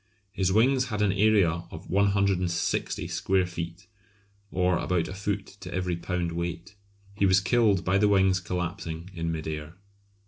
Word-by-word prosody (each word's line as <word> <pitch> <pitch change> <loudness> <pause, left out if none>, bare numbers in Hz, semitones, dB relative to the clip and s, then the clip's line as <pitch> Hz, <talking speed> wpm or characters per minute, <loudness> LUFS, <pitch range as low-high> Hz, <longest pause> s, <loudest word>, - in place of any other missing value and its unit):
His 95 -2 0
wings 130 +5 +3
had 105 -3 -1
an 100 - +3
area 95 -5 +3
of 80 - -10
160 100 -3 +1
square 95 -1 +1
feet, 85 +1 -6 0.6
or 90 -1 +1
about 85 -2 0
a - - -6
foot 100 0 -2
to - - -8
every 90 -1 -1
pound 85 0 -2
weight. 85 +2 -4 0.4
He 100 -1 +2
was 95 0 +5
killed 100 -1 +2
by 95 +2 +3
the 105 0 +4
wings 95 -2 +4
collapsing 90 -1 -4
in 85 -1 -2
mid 80 -1 -4
air. 75 +1 -5
95 Hz, 160 wpm, -27 LUFS, 85-100 Hz, 0.6 s, was